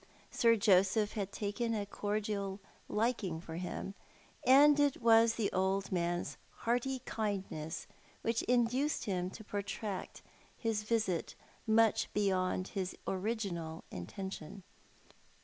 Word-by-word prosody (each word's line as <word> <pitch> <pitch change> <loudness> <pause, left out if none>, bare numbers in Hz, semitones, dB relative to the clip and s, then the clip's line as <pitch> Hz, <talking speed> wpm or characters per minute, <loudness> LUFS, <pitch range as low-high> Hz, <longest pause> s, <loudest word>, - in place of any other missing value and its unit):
Sir 230 -1 +4
Joseph 200 +1 +3
had 200 -2 -3
taken 225 +3 -2
a 205 -1 -1
cordial 205 -1 -2 0.3
liking 210 -6 0
for 165 -1 -7
him, 185 +2 -4 0.5
and 290 +3 +8
it 290 -2 +3
was 230 -1 +5
the 220 -3 0
old 190 +1 0
man's 175 -1 -1 0.3
hearty 245 +2 0
kindness 195 -7 -3 0.4
which 230 0 +1
induced 250 +4 +2
him 185 -3 -1
to 220 - -10
protract 205 -1 -4 0.4
bis 225 -2 +1
visit 210 -5 -1 0.3
mucli 220 0 +4
beyond 185 -2 +1
his 190 -2 -3
original 190 -5 -2
intention. 190 - -6
205 Hz, 115 wpm, -34 LUFS, 185-230 Hz, 0.5 s, and